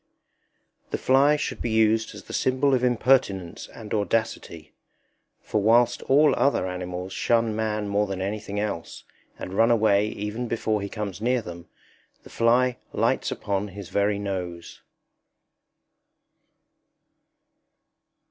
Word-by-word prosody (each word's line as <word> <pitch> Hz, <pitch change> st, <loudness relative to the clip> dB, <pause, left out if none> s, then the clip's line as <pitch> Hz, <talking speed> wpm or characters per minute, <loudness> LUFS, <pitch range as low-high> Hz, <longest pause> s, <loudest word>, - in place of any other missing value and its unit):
The -, -, -2 dB
fly 140 Hz, +3 st, +4 dB
should 150 Hz, -, -4 dB
be 120 Hz, -, -2 dB
used 110 Hz, 0 st, +2 dB
as -, -, -10 dB
the -, -, -11 dB
symbol 130 Hz, +2 st, +1 dB
of 125 Hz, -1 st, +1 dB
impertinence 120 Hz, -7 st, +1 dB
and 110 Hz, -2 st, -9 dB
audacity; 105 Hz, -6 st, -2 dB, 0.7 s
for 105 Hz, -, -1 dB
whilst 120 Hz, +3 st, +3 dB
all 145 Hz, +3 st, +5 dB
other 135 Hz, -9 st, +1 dB
animals 90 Hz, 0 st, -5 dB
shun 115 Hz, -2 st, +1 dB
man 110 Hz, -1 st, -2 dB
more 100 Hz, +1 st, +1 dB
than 95 Hz, -1 st, -4 dB
anything 100 Hz, +1 st, -3 dB
else, 105 Hz, -6 st, -4 dB, 0.3 s
and 90 Hz, -, -7 dB
run 115 Hz, +4 st, +4 dB
away 105 Hz, -3 st, +3 dB
even 110 Hz, +4 st, -4 dB
before 110 Hz, -2 st, -1 dB
he 100 Hz, -, -4 dB
comes 105 Hz, -3 st, -5 dB
near 125 Hz, +1 st, +1 dB
them, 85 Hz, -2 st, -9 dB, 0.6 s
the -, -, -15 dB
fly 120 Hz, +2 st, +2 dB, 0.2 s
lights -, -, +1 dB
upon 100 Hz, 0 st, -2 dB
his 100 Hz, -1 st, -9 dB
very 100 Hz, 0 st, +1 dB
nose. 90 Hz, -4 st, -5 dB
105 Hz, 130 wpm, -25 LUFS, 100-120 Hz, 0.7 s, all